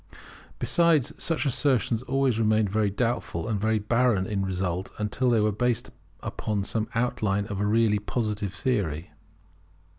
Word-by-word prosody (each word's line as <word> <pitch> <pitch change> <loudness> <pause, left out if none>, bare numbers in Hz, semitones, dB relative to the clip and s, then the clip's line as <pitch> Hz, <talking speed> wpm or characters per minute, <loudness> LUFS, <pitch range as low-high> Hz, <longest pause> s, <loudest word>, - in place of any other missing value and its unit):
Besides, 165 -6 +3
such 165 -2 0
assertions 125 -4 +1
always 130 -3 +1
remained 110 -2 +2
very 105 0 +2
doubtful 110 -4 -2
and 105 -3 -1
very 110 +1 +2
barren 110 -2 +2
in 100 -1 -1
result, 95 -1 -2
until 105 +4 0
they 115 -2 +3
were 105 0 +2
based 120 +3 -1 0.3
upon 105 -2 -2
some 110 +2 -2
outline 110 -4 0
of 100 -2 -4
a 105 - +1
really 110 -1 +3
Positive 105 -2 -2
theory. 95 - -2
110 Hz, 145 wpm, -26 LUFS, 100-120 Hz, 0.3 s, Besides